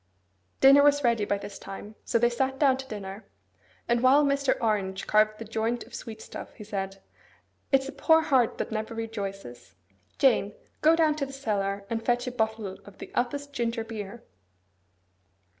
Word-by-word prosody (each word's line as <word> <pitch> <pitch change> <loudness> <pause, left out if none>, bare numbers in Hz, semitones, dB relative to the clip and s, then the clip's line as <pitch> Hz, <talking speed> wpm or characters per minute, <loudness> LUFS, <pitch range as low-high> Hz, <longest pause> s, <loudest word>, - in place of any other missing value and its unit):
Dinner 275 +1 +8
was 290 0 +4
ready 230 -4 +2
by 205 - 0
this 200 0 -9
time: 195 +2 -9
so - - +2
they 240 +1 +3
sat 265 +2 -1
down 275 -2 +4
to 265 0 -8
dinner; 205 -2 -7 0.6
and 235 0 +2
while 275 +3 +5
Mr. 280 -1 +2
Orange 200 -4 -1
carved 215 0 +3
the 225 - -7
joint 225 +2 -2
of 235 - -18
sweet 220 -1 -8
stuff, - - -9
he 210 - -10
said, 195 -2 -5 0.7
'It's 270 0 +3
a - - -5
poor 320 +3 +4
heart 260 -7 +2
that - - -3
never 220 +1 -3
rejoices. 195 - -6 0.4
Jane, 225 -6 +3 0.3
go 320 +1 +6
down 320 -2 +3
to 280 - -1
the - - -9
cellar, 200 -6 -2
and 225 +1 -3
fetch 245 +1 +1
a 250 - -3
bottle 220 -4 -2
of 205 - -15
the - - -10
Upest 285 +4 -2
ginger 230 -2 -1
beer. 220 0 -7
230 Hz, 175 wpm, -27 LUFS, 205-265 Hz, 0.7 s, Dinner